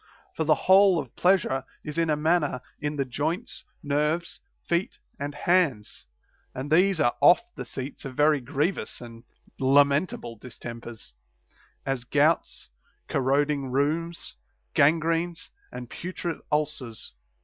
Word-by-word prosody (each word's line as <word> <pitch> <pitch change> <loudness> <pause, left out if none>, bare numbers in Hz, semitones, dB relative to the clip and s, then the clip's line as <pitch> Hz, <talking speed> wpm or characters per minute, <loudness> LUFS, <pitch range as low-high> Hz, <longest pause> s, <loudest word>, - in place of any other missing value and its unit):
For 160 - -2
the 155 - +5
whole 190 -1 +6
of 135 -7 -5
pleasure 175 -8 +2 0.2
is 150 +2 -4
in 165 -1 +1
a 150 - +3
manner 150 -4 +1 0.2
in 150 0 -2
the 140 -2 -1
joints, 160 - -3 0.2
nerves, 150 +3 -1 0.3
feet, 170 +2 0 0.2
and 145 +1 -4
hands; 145 - 0 0.5
and 135 +3 -5
these 185 +2 +4
are 135 -5 +3
oft 265 - +5
the - - -6
seats 135 +1 -7
of 135 -2 -7
very 150 +1 +4
grievous 150 +8 -2
and 115 -1 -11 0.3
lamentable 140 -2 +2
distempers, 115 - -9 0.7
as 135 -3 -1
gouts, 150 - +1 0.4
corroding 140 +1 +1
rheums, 155 +6 -1 0.4
gangrenes, 165 +3 +2 0.2
and 125 -1 -7
putrid 175 +3 -5
ulcers. 150 - -2
150 Hz, 125 wpm, -26 LUFS, 135-165 Hz, 0.7 s, whole